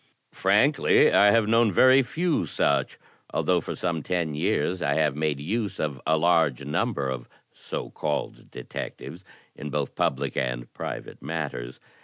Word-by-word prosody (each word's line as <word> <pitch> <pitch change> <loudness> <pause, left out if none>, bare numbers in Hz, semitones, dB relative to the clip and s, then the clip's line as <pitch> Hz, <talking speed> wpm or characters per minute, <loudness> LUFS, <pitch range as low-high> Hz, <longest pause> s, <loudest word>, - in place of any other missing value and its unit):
Frankly, - - +3
I 105 - +6
have 115 0 +3
known 115 -1 +4
very 130 +8 +6
few 165 +6 -1
such, - - 0 0.3
although - - +1
for - - -5
some 85 -3 -2
ten 85 -3 -2
years 90 +4 0
I 70 0 +1
have 75 -3 +1
made 75 -2 -1
use 100 +5 -3
of 70 -4 -3
a 80 0 +3
large 80 -5 +2
number 70 -1 -1
of 65 -2 -5 0.2
so - - -6
called 75 -1 -4
detectives 85 +7 -8 0.3
in 75 - -7
both 70 - -2
public 70 +1 -1
and - - -3
private - - -7
matters. 70 -5 -5
80 Hz, 150 wpm, -25 LUFS, 70-95 Hz, 0.3 s, I